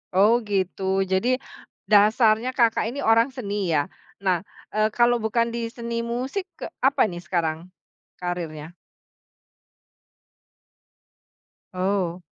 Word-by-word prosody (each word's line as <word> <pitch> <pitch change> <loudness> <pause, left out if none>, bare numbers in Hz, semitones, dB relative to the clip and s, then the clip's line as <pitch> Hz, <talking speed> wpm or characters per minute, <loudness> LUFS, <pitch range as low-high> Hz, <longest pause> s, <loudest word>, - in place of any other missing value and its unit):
Oh, 215 +6 +4
gitu. 195 -2 -2 0.2
Jadi 235 +8 +1 0.5
dasarnya 215 +3 +4
Kakak 230 -3 +3
ini 280 - -6
orang 230 +4 +4
seni, 205 -7 -3
ya? 145 -1 +1 0.4
Nah, 180 -2 +2 0.3
eee, 215 0 +3
kalau 240 0 +4
bukan 230 +1 +1
di 230 -1 -3
seni 235 0 -4
musik 255 +11 -3
ke - - -5 0.2
apa 270 -3 +4
nih 175 0 -7
sekarang 170 0 -2 0.5
kariernya? 170 -3 -5 3.0
Oh. 185 -1 -1
215 Hz, 105 wpm, -24 LUFS, 180-235 Hz, 3.0 s, Oh